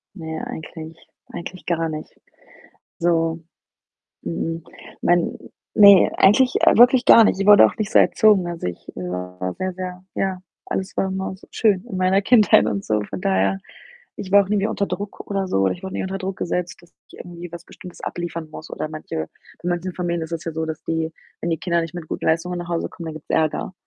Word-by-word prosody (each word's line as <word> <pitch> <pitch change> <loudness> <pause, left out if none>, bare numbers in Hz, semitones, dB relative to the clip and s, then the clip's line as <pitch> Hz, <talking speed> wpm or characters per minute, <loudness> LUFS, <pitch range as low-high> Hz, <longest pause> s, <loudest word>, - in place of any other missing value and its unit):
Na 165 - -9
ja, 160 0 -5
eigentlich 160 0 -8 0.3
eigentlich 180 +1 -8
gar 165 -2 0
nicht 155 0 -7 0.8
so. 165 -1 +1 0.8
Mh-mh, 165 - -3 0.4
mein 175 -1 +2 0.4
ne, 200 -3 +8
eigentlich 250 +6 +5 0.2
wirklich 245 +1 +6
gar 230 - +8
nicht. 195 - +1
Ich 195 - 0
wurde 205 -1 +9
auch - - -5
nicht 215 0 -2
so - - +5
erzogen. 205 -5 +4
Also, 170 - -5
ich 85 - -9
war 90 0 -5
sehr, 185 0 -2
sehr 185 0 -7
ja, 190 -1 -2 0.3
alles 190 - -4
war 195 - +1
immer 190 0 -3
so - - -18
schön 205 -3 +1
in 185 - -4
meiner 185 +2 +2
Kindheit 210 - +5
und 100 -2 -2
so. 105 -1 0
Von 100 -2 -7
daher, 95 0 +1 0.6
ich 190 - -7
war 200 0 +8
auch 190 - -12
nie 210 - +1
mehr 205 +2 0
unter 200 - -1
Druck 205 0 -6
oder 195 -1 -1
so 95 - 0
oder 95 0 +2
ich 180 - -10
wurde 190 - -6
nie - - -2
unter 190 +1 -4
Druck 190 -1 -4
gesetzt, 175 0 -3
dass 175 - -20 0.2
ich - - -15
irgendwie 175 -1 -9
was 170 0 -9
Bestimmtes 180 - -13
abliefern 170 -2 -5
muss 155 - -10
oder - - -4
manche 155 - -5 0.3
bei 175 - -2
manchen 175 +1 -2
Familien 170 -2 -2
ist 160 +1 -7
es 165 -1 -4
ja 165 - -3
so, 160 0 -2
dass 160 -1 -6
die, 160 0 -2 0.3
wenn 170 - -2
die 160 - 0
Kinder 170 -2 0
nicht 165 0 -7
mit 170 -3 -7
gut - - -5
Leistungen 175 +2 0
nach 175 0 -6
Hause 170 -1 -2
kommen, 170 -2 -10
dann 160 - -5
gibt's 155 - -12
Ärger 155 +3 0
175 Hz, 215 wpm, -22 LUFS, 160-190 Hz, 0.8 s, wurde